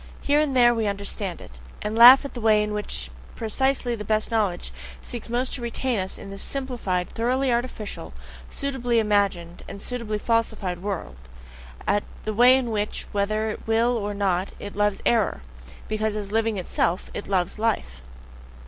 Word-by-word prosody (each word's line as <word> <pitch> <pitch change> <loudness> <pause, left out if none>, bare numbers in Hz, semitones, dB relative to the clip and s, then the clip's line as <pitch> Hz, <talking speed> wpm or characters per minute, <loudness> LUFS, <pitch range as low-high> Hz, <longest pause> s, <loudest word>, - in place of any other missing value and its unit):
Here 290 +1 +3
and 295 -3 +1
there 240 -1 +6
we 225 -2 0
understand 200 -2 -3
it, - - -13 0.2
and 210 +1 -2
laugh 250 +4 +10
at 280 - -6
the 240 - -6
way 215 -1 +4
in 210 0 -3
which 65 - -4 0.2
precisely 250 +2 0
the 210 - -6
best 215 +2 0
knowledge 205 -6 -1 0.3
seeks 240 -2 -6
most 245 +2 0
to 250 - -2
retain 240 0 -1
us 190 0 -3
in 195 - -9
this 195 - -6
SIMPLIFIED, 240 -10 -2
thoroughly 255 +3 0
artificial, 235 -3 -3 0.4
suitably 255 -4 -1
imagined, 200 -6 +1
and - - -8
suitably 230 -1 -3
falsified 220 -5 -1
world: 190 - -4 0.7
at 205 - +2 0.2
the 215 - -2
way 245 +4 +7
in 245 -3 -2
which, 210 -1 -2
whether 215 +2 0
it - - -9
will 230 +2 +2
or 205 -2 -2
not, 190 -2 0
it 205 - -8
loves 205 -1 0
error, 220 - +2 0.4
because, 215 0 -1
as 205 -2 -4
living 225 -1 +1
itself, 180 0 -1
it - - -6
loves 185 0 0
life! 200 - -1
215 Hz, 170 wpm, -24 LUFS, 200-240 Hz, 0.7 s, laugh